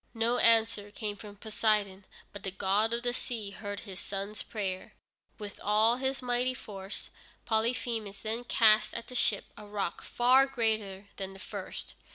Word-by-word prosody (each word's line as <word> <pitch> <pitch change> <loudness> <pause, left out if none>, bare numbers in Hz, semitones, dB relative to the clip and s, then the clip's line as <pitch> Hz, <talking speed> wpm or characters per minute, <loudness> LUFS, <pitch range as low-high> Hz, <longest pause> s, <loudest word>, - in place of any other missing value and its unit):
No 230 +2 +2
answer 225 -2 +4
came 210 0 -4
from 205 0 -10
Poseidon, 210 -2 +1 0.3
but 205 - -7
the 195 - -2
god 200 +3 +2
of 235 0 0
the 245 0 +1
sea 225 -5 -4
heard 205 0 -5
his 190 -4 -8
son's 200 +1 -4
prayer. 190 -4 -4 0.4
With 210 -2 -7
all 215 +3 +4
his 265 0 -1
mighty 250 +1 +1
force 195 -4 -6 0.3
Polyphemus 225 -2 0
then 225 +3 -3
cast 220 -2 +5
at 230 - -6
the - - -9
ship 210 -4 +2
a 210 0 -10
rock 205 -4 -2
far 255 +3 +5
greater 220 -6 -1
than 195 -1 -4
the 195 - -12
first. - - -7
215 Hz, 165 wpm, -31 LUFS, 200-235 Hz, 0.4 s, cast